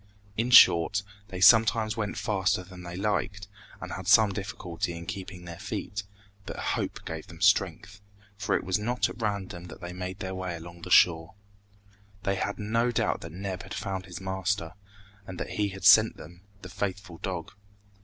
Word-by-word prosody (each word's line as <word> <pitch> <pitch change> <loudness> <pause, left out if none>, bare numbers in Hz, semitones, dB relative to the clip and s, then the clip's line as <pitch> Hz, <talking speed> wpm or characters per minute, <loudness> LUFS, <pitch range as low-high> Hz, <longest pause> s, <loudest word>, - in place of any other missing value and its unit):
In 115 +4 0
short, 100 -4 +7 0.2
they 90 - -7
sometimes 110 +2 +5
went 105 -2 -3
faster 95 -3 0
than 90 0 -12
they 90 -1 -7
liked, 100 0 -2 0.3
and - - -7
had - - -6
some 110 -2 +6
difficulty 95 -4 -4
in 85 - -8
keeping 95 -2 -7
their 85 -1 -8
feet; 100 +1 -4 0.5
but - - -6
hope - - -3
gave - - -6
them - - -12
strength, 100 +1 +1 0.3
for 100 - -1
it - - -1
was 95 +2 0
not 120 +4 0
at - - -9
random 95 -5 -3
that 90 - -11
they 90 -1 -7
made 90 0 -5
their 95 -1 -5
way 95 -2 -4
along 85 +1 -10
the 90 - -8
shore. 80 -3 +4 0.9
They 100 - +1
had 100 +1 -2
no 115 +3 0
doubt - - 0
that 80 - -8
Neb 95 +1 -5
had 95 - -8
found 95 -1 -4
his 90 -2 -7
master, 95 -2 -2 0.5
and 95 -1 -7
that - - -4
he 105 -1 0
had 95 0 -7
sent 110 +2 +7
them 85 +3 -12 0.2
the 90 - -8
faithful 95 -3 -4
dog. - - -4
95 Hz, 185 wpm, -28 LUFS, 90-105 Hz, 0.9 s, short